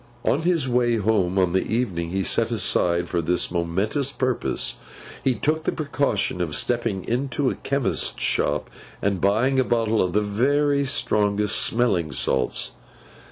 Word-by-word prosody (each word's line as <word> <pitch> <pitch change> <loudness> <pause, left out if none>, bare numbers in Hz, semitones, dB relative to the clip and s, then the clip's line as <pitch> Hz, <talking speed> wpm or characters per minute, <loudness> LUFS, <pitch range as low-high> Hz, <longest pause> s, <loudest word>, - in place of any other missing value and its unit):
On 145 - +2
his 165 -5 +1
way 120 -1 +2
home, 100 -4 +1
on 90 -2 +2
the 95 - +2
evening 95 -8 -2
he 95 +2 -1
set - - +2
aside 85 0 +1
for 85 -1 -1
this 90 +2 0
momentous 95 - -1
purpose, 130 -3 -2 0.5
he 130 -2 +2
took 155 +4 -1
the - - 0
precaution 140 - -1
of 80 -4 -1
stepping 115 -2 0
into 130 +2 0
a - - -5
chemist's 140 -2 -1
shop 75 0 0 0.3
and 100 -3 -1
buying 115 +7 +2
a - - +4
bottle 115 -3 +1
of 90 -1 -1
the 105 - +2
very 140 +7 +1
strongest 105 -5 +1
smelling 100 -10 +1
salts. 65 0 0
110 Hz, 155 wpm, -23 LUFS, 90-130 Hz, 0.5 s, a